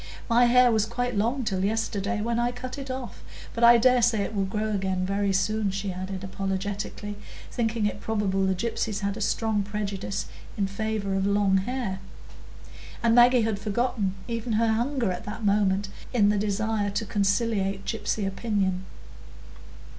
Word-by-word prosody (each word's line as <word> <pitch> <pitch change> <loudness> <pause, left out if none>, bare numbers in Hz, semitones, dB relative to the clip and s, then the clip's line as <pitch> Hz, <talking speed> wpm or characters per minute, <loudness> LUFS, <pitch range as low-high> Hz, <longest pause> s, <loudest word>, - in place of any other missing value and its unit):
"My 240 +1 +5
hair 245 0 +6
was 220 -1 +2
quite 245 +1 -2
long 235 +6 0
till 190 -4 -1
yesterday, 215 0 -1
when 235 +2 0
I 240 0 +1
cut 255 +3 -7
it 270 -1 -7
off; 255 -2 -6 0.3
but 235 - -2
I 235 0 +9
dare 250 +1 +4
say 225 -2 +3
it 215 - -4
will 200 -2 0
grow 215 +3 -2
again 190 -2 -1
very 200 +1 0
soon," 210 +2 +1
she 195 0 -3
added 185 +1 -5
apologetically, 195 +2 -4 0.3
thinking 225 -2 0
it 205 -1 -2
probable 200 -3 0
the 190 - +1
gypsies 215 0 -2
had 200 0 -1
a 220 - -6
strong 215 0 +1
prejudice 200 -1 -3 0.3
in 200 - +1
favour 200 0 -2
of 195 0 +1
long 200 -1 +3
hair. 205 -2 -2 1.0
And 230 -1 +4
Maggie 245 0 +6
had 220 -2 -1
forgotten 210 -2 -1
even 230 -1 -3
her 225 +1 +3
hunger 240 -2 0
at 180 0 -5
that 215 +1 -5
moment 200 -1 +2 0.2
in 210 -4 +4
the 210 - +2
desire 210 0 0
to 210 +3 -2
conciliate 200 -1 0
gypsy 215 -2 -1
opinion. 195 -3 -1
210 Hz, 170 wpm, -26 LUFS, 195-230 Hz, 1.0 s, I